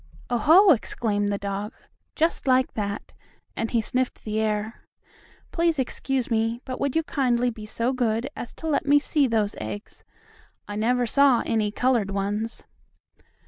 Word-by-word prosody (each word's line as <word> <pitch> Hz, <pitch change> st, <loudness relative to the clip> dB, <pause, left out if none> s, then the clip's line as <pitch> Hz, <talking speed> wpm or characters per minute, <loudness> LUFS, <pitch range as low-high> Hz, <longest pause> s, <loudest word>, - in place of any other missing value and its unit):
"Oh, 240 Hz, -, +2 dB
ho!" 355 Hz, -, +7 dB
exclaimed 210 Hz, -5 st, 0 dB
the 200 Hz, -, -1 dB
dog, 200 Hz, +2 st, -4 dB, 0.4 s
just 325 Hz, -2 st, 0 dB
like 255 Hz, 0 st, +3 dB
that, 205 Hz, -1 st, -4 dB, 0.4 s
and 225 Hz, -, -2 dB
he 235 Hz, -, +1 dB
sniffed 255 Hz, +3 st, -2 dB
the 215 Hz, 0 st, -2 dB
air. 215 Hz, +1 st, -2 dB, 0.7 s
"Please 335 Hz, -2 st, +1 dB
excuse 265 Hz, -1 st, -2 dB
me. 225 Hz, +1 st, +1 dB
But 255 Hz, -, -5 dB
would 280 Hz, -2 st, -1 dB
you 325 Hz, -, +2 dB
kindly 250 Hz, -5 st, +1 dB
be 215 Hz, -2 st, -10 dB
so 235 Hz, +4 st, -1 dB
good 235 Hz, -1 st, 0 dB
as 240 Hz, -, -6 dB
to 320 Hz, -, -6 dB
let 295 Hz, -1 st, 0 dB
me 290 Hz, +1 st, +6 dB
see 290 Hz, -1 st, +2 dB
those 215 Hz, -3 st, 0 dB
eggs? 110 Hz, -1 st, -7 dB, 0.6 s
I 205 Hz, -, -5 dB
never 245 Hz, +3 st, +1 dB
saw 270 Hz, 0 st, +4 dB
any 220 Hz, -2 st, +1 dB
colored 235 Hz, -2 st, +1 dB
ones." 205 Hz, +3 st, -3 dB
230 Hz, 160 wpm, -25 LUFS, 210-260 Hz, 0.7 s, ho